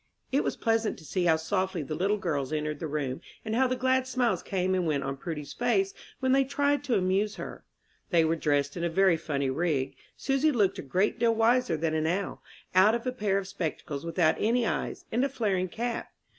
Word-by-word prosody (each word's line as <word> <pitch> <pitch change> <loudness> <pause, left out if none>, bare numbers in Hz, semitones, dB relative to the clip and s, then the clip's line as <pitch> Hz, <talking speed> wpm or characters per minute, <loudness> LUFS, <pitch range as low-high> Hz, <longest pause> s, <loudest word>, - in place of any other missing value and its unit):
It 275 +2 +2
was - - -2
pleasant 225 -1 +1
to 160 - -14
see 175 +5 -1
how 165 -2 +5
softly 185 +1 -1
the 140 - -5
little 195 +6 +1
girls 150 -8 -2
entered 150 -1 -2
the 165 - -3
room, 140 -3 -3 0.2
and 220 0 -1
how 260 +2 +4
the 255 - 0
glad 260 0 +1
smiles 250 -3 +1
came 185 -1 -1
and 180 -2 +1
went 145 -3 0
on 135 0 -3
Prudy's 150 0 -6
face 205 -6 +1 0.3
when 260 0 +1
they 270 +1 +5
tried 285 +2 +1
to 255 - +2
amuse 195 +3 +1
her. - - -8 0.5
They 170 -3 +4
were 160 +1 +2
dressed 145 -3 0
in 170 - -3
a 170 - +1
very 190 +1 +4
funny 140 -4 -1
rig. 140 -3 0 0.2
Susy 275 +3 +2
looked 210 -8 +1
a - - -2
great 180 +9 0
deal 230 -1 +3
wiser 230 -4 +3
than 160 0 -1
an 160 0 +1
owl, 190 +4 -2 0.3
out 190 +5 +6
of 235 - -4
a 255 - 0
pair 210 -6 0
of 195 -1 -3
spectacles 155 -5 -4
without 165 -1 +2
any 235 +2 +2
eyes, - - -3
and 240 +3 +1
a 275 - +1
flaring 200 -8 0
cap. 235 +4 -3
190 Hz, 220 wpm, -28 LUFS, 160-235 Hz, 0.5 s, out